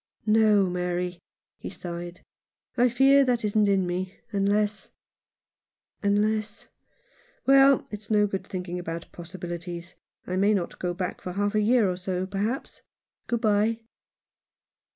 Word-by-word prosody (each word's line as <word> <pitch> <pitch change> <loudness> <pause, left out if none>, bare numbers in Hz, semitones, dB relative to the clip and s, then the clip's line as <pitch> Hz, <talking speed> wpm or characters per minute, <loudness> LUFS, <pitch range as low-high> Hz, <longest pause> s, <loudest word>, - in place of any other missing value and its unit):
" - - -47
No, 215 -2 +4
Mary," 180 0 -2 0.4
he - - -6
sighed, 175 0 -7 0.3
" - - -68
I 245 0 +4
fear 270 +3 +5
that 245 -4 0
isn't 210 0 +2
in 195 -2 +2
me 180 +1 -4
— 230 - -39
unless 205 +1 0 0.6
— - - -58
unless 210 +1 0 0.8
Well, 275 0 +6
it's 210 0 -7
no 210 -1 +4
good 195 -2 -4
thinking 180 -1 -5
about 170 -1 -6
possibilities. 175 0 -7 0.3
I 185 - -3
may 205 +2 +3
not 180 -3 -3
go 175 -1 -2
back 180 -1 -4
for 180 - -5
half 205 +2 0
a 215 - +2
year 225 0 +4
or 180 -1 -2
so, 185 0 -2
perhaps. 205 +7 -3 0.5
Good 235 -1 -1
bye." 220 +1 +2
200 Hz, 150 wpm, -26 LUFS, 180-215 Hz, 0.8 s, Well